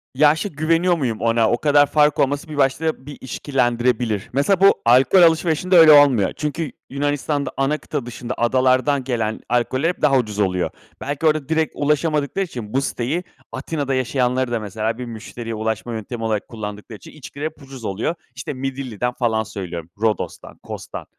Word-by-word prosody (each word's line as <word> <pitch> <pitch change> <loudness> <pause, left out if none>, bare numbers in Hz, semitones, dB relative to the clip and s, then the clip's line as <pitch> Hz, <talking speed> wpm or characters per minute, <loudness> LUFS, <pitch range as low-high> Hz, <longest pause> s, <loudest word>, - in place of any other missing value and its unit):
Ya, 150 +2 +5
şi 200 +6 -3
güveniyor 165 +4 +1
muyum 120 -7 -2
ona? 115 -1 +2
O 120 - +2
kadar 145 0 +4
fark 150 0 +2
olması 140 +3 0
bir 150 - -6
başta, 140 +1 0
bir 145 - -9
işkillendirebilir. 120 -5 -1
Mesela, 175 +8 +2
bu, 195 - +7
alkol 130 +9 +5
alışverişinde 170 +2 +3
öyle 160 -2 +9
olmuyor. 140 -9 +5
Çünkü, 150 +1 -3 0.2
Yunanistan'da 145 +1 -1
ana 140 +3 +1
kıta 145 -6 -5
dışında, 120 +1 -6
adalardan 130 +3 +2
gelen 115 -4 -2
alkoller 130 +6 +1
hep 180 - -5
daha 140 -3 +4
ucuz 105 -4 -2
oluyor. 90 -3 +1 0.3
Belki 145 +4 -3
orada 155 -2 +2
direkt 160 -1 +1
ulaşamadıkları 150 +4 0
için, 120 -9 -8
bu 135 - +2
siteyi, 140 +8 -2 0.3
Atina'da 145 -4 -3
yaşayanları 130 -1 0
da 115 - 0
mesela, 110 +2 -3
bir 125 - -5
müşteriye 115 0 -7
ulaşma 110 +2 -3
yöntemi 115 +1 -5
olarak 110 -2 -1
kullandıkları 105 0 -7
için, - - -14
içkiler 145 0 -8
hep 155 -1 -6
ucuz 135 -4 -10
oluyor. 110 - -2 0.2
İşte 135 +2 -5
Midilli'den 130 -3 -3
falan 110 -3 0
söylüyorum. 90 -6 -7
Rodos'tan, 110 -3 -2
Cos'dan - - -7
130 Hz, 165 wpm, -21 LUFS, 115-150 Hz, 0.3 s, öyle